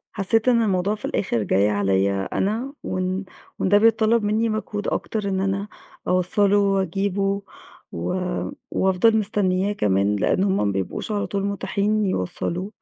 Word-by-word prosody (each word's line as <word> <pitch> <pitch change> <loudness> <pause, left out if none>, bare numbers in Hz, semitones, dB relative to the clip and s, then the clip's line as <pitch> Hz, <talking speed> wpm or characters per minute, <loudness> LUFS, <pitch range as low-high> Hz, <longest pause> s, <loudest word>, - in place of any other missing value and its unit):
حسّيت 220 +4 +1
إن 235 -2 +4
الموضوع 195 0 +1
في 210 - -11
الآخِر 120 - -1
جاي 100 +1 +2
عليّا 95 -1 +1
أنا 230 +8 -1
وإن 185 +1 -2 0.3
وإن - - 0
ده 205 +1 +6
بيتطلَّب 225 +1 +3
منّي 220 +2 +1
مجهود 215 -1 -3
أكتر 210 -3 -2
إن 190 -1 -1
أنا 195 +1 -1 0.4
أوصَّله 195 +3 +3
وأجيبه 195 0 0 0.5
و 85 - -3 0.6
وأفضل 190 +4 +3
مستنّياه 200 -2 +1
كمان 100 - +1
لإن 185 - +1
هم 195 -1 +1
ما - - +1
بيبقوش 95 - -3
على 205 - -1
طول 200 -1 -2
مُتاحين 200 +1 0
يوصّلوه، 180 - -2
195 Hz, 145 wpm, -23 LUFS, 180-210 Hz, 0.6 s, ده